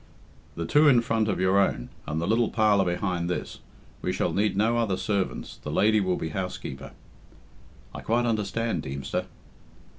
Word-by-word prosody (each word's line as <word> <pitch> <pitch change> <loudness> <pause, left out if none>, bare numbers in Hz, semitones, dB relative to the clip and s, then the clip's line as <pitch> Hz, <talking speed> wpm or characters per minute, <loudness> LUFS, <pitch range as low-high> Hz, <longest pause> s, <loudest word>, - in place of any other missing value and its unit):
"The 85 - -3
two 150 - +5
in 125 -5 +6
front 115 -2 0
of 100 - -1
your 95 +1 +3
own, 100 - 0 0.2
and 75 +2 -2
the 85 - -1
little 115 +3 +2
parlour 105 -3 +3
behind 90 -1 -1
this. 90 - -4 0.4
We - - -1
shall - - -1
need 100 -1 +1
no 115 +3 +2
other 105 -5 0
servants 100 -2 -2
the - - -8
lady 110 +1 +3
will 95 -2 0
be 80 - -3
housekeeper." 90 -6 -5 1.0
"I - - -7
quite 120 +2 +1
understand, 110 -3 -1
Deemster." 70 -1 -4
100 Hz, 170 wpm, -26 LUFS, 90-110 Hz, 1.0 s, in